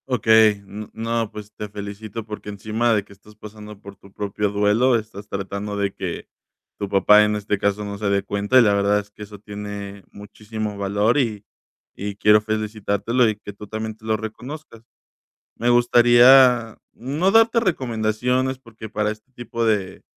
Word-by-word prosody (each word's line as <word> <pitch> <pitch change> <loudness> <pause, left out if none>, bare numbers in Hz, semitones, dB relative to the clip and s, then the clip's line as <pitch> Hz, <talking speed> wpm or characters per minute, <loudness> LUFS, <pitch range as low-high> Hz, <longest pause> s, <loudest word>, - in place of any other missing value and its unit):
Okey. 110 -3 +5
N 105 +2 -9
no, 115 0 -2
pues 105 -1 -10
te 105 - -7
felicito 105 +2 -7
porque 105 -1 -8
encima 110 +4 -1
de 105 -2 +1
que 100 - -17
estás 105 +2 -19
pasando 105 -1 -11
por 100 -1 -12
tu 100 - -19
propio 100 +1 -2
duelo, 105 +5 +2
estás 105 -2 -5
tratando 100 +1 -4
de 100 -1 -1
que 90 -3 -6 0.5
tu 100 - -4
papá, 105 +2 +5
en 105 0 0
este 105 -1 -2
caso, 100 +1 -1
no 100 0 -6
se 105 -1 -1
dé 100 0 +1
cuenta. 100 +5 +1
Y - - +6
la 105 -2 +3
verdad 100 0 +2
es 105 0 -10
que 105 - -17
eso 105 0 -11
tiene 100 -1 -8
muchísimo 105 +1 -7
valor 100 +5 +1
y 110 -7 -1 0.5
y 100 0 -6
quiero 105 +1 +5
felicitártelo 110 +2 -1
y 110 - 0
que 105 0 -10
tú 105 +1 -11
también 110 +1 -5
te 110 - -17
lo 110 0 +1
reconozcas. 115 +4 -9 0.8
Me 120 - -1
gustaría 120 0 +5
no 145 +10 -1
darte 225 +1 +5
recomendaciones, 125 - -1
porque 115 -3 -11
para 105 0 -1
este 110 +4 -10
tipo 120 -1 -4
de 100 -4 -1
105 Hz, 175 wpm, -22 LUFS, 100-115 Hz, 0.8 s, Y